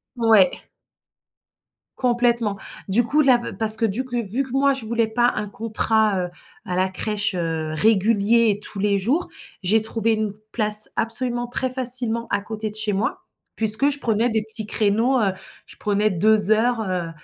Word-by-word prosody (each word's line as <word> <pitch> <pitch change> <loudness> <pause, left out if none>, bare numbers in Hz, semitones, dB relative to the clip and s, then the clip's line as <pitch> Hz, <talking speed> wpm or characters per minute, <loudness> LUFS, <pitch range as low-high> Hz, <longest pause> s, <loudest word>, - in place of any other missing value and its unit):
Ouais. 225 -6 +2 1.3
Complètement. 240 -4 0 0.3
Du 210 +5 +1
coup, 295 +6 +1
là, 260 -4 +4
b - - -7
parce 220 -1 +8
que 225 - -5
du 220 +2 -1
c 245 -1 -3
vu 230 +6 -3
que 260 - -12
moi 275 +1 +2
je 265 -4 -7
voulais 230 0 -1
pas 240 +2 +1
un 210 -1 -5
contrat, 220 -3 -1
heu, - - -8 0.4
à 180 - -4
la 185 +1 0
crèche, 210 +2 -2
heu, 165 -3 -3
régulier 220 +4 +2
et 205 - -4
tous 210 - -10
les 200 0 0
jours. 270 - -1 0.3
J'ai 215 +5 +2
trouvé 225 +1 -1
une 215 -1 -2 0.2
place 215 -2 +4
absolument 240 +1 0
très 255 +1 -2
facilement, 245 -2 +1
à - - -1
côté 215 +1 -6
de 210 - -5
chez 215 -1 0
moi, 200 +2 -3 0.3
puisque 220 +6 +5
je 290 - -3
prenais 230 -1 0
des 220 -2 -1
petits 220 0 -8
créneaux, 225 +5 +1
heu, 200 -4 0 0.3
je - - -14
prenais 210 +1 0
2 210 +3 +2
heures, 230 +2 +1
heu, 180 -2 -3
220 Hz, 180 wpm, -21 LUFS, 205-240 Hz, 1.3 s, parce